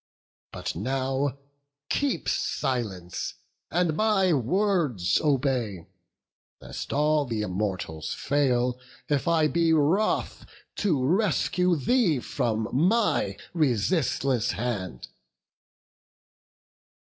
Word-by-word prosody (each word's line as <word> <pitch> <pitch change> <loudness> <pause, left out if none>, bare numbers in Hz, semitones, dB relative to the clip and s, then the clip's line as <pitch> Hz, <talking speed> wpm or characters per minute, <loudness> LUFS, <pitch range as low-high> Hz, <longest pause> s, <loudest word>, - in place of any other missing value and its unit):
But - - -5
now, 135 - -1 0.5
keep 285 - -1
silence, 100 -9 -2 0.3
and 170 -1 +1
my 195 -3 +3
words 150 - +1
obey, 125 - 0 0.7
Lest - - -7
all 150 -1 +2
th' - - -2
Immortals 95 -6 -3
fail, 125 -3 +1 0.3
if 145 -1 0
I 165 -2 +4
be 165 +1 +2
wroth, 160 +8 +1 0.3
To 155 -11 +1
rescue 180 0 +2
thee 165 - +2
from 110 -2 -1
my 200 - +2 0.2
resistless 135 - +1
hand." 95 - -4
140 Hz, 85 wpm, -26 LUFS, 120-170 Hz, 0.7 s, I